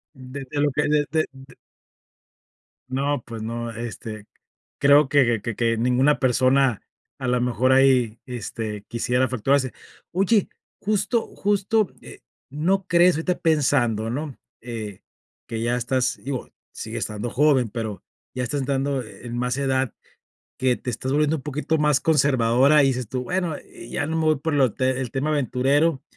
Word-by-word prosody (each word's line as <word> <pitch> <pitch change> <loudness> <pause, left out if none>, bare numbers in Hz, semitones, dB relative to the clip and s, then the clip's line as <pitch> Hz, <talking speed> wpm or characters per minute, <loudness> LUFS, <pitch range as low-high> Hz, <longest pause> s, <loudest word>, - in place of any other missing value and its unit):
De 130 +1 -8
de 145 - -2
lo 145 -1 +2
que 150 +3 0
de 150 0 +2
de 160 -1 +2
d 135 0 -15 1.4
No, 135 0 -1
pues 115 -2 -7
no, 115 +1 -4
este, 110 -2 -7 0.5
creo 145 +1 +6
que 120 -6 +3
que 115 0 -4
que 115 0 +1
ninguna 125 +5 +3
persona 130 -2 +3 0.4
a 130 - -3
la 125 0 +2
mejor 125 +1 +1
ahí, 130 -4 +3
este, 110 -4 -5
quisiera 125 +2 +1
fracturarse. 130 +2 +1 0.4
Oye, 195 +3 +2 0.3
justo 215 +3 0
justo, 205 +1 +1
eh, - - -12 0.3
no 180 +7 0
crees 175 0 +5
ahorita 175 +3 -1
pensando, 130 -8 +2
¿no?, 140 +2 -4 0.2
eh, 110 -5 -7 0.5
que 115 -1 -4
ya 120 +1 +1
estás 125 +1 0
digo, 135 -2 -4 0.2
sigues - - -5
estando 105 +3 -3
joven 135 -2 +3
pero 110 -1 -5 0.3
ya 125 - -2
estás 140 +3 -2
entrando 135 0 -1
en 120 +2 -8
más 125 +1 -1
edad 130 -2 0 0.7
que 130 -1 +2
te 125 - -5
estás 130 +3 -3
volviendo 150 +2 +2
un 135 - -8
poquito 150 +3 -1
más 150 -2 +3
conservadora 140 -1 +4
y 135 - +4
dices 125 -4 -2
tú: 125 +1 -3
"Bueno, 180 -2 -1
eh, - - -13
ya 145 - -2
no 160 +1 -2
me 160 - 0
voy 155 -1 +3
por 155 +2 -2
lo 130 -5 +3
te 130 0 0
el 125 -3 -3
tema 135 +3 -2
aventurero, 140 +2 +1
130 Hz, 165 wpm, -23 LUFS, 120-150 Hz, 1.4 s, creo